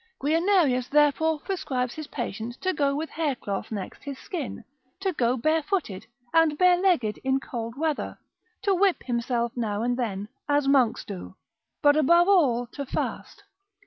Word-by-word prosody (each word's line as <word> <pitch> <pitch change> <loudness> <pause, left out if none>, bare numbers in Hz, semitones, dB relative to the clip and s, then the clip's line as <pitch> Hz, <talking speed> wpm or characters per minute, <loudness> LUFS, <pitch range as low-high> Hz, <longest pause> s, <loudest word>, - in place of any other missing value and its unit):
Guianerius 310 -4 +2
therefore 300 +2 +3
prescribes 285 -10 -2
his 310 -1 -7
patient 240 -3 -5
to 375 0 0
go 280 -3 +1
with 315 +2 -4
hair 305 -4 -1
cloth 200 -3 -5
next 200 -4 -6
his 280 -2 -6
skin, 325 - -6 0.4
to 385 -1 -1
go 250 -3 +1
barefooted, 310 - -1 0.3
and 325 -2 +4
barelegged 355 - +3
in 265 0 +2
cold 230 -3 -6
weather, 310 -1 -2 0.5
to 400 - +3
whip 385 0 +2
himself 235 -1 -1
now 220 -3 -2
and 245 +1 0
then, 205 -5 -3 0.2
as 290 -1 +2
monks 260 -5 +3
do, 195 -3 -8 0.5
but 290 0 +6
above 340 +4 +5
all 275 -12 +4
to 285 - -5
fast. 270 - -4
280 Hz, 150 wpm, -26 LUFS, 240-325 Hz, 0.5 s, but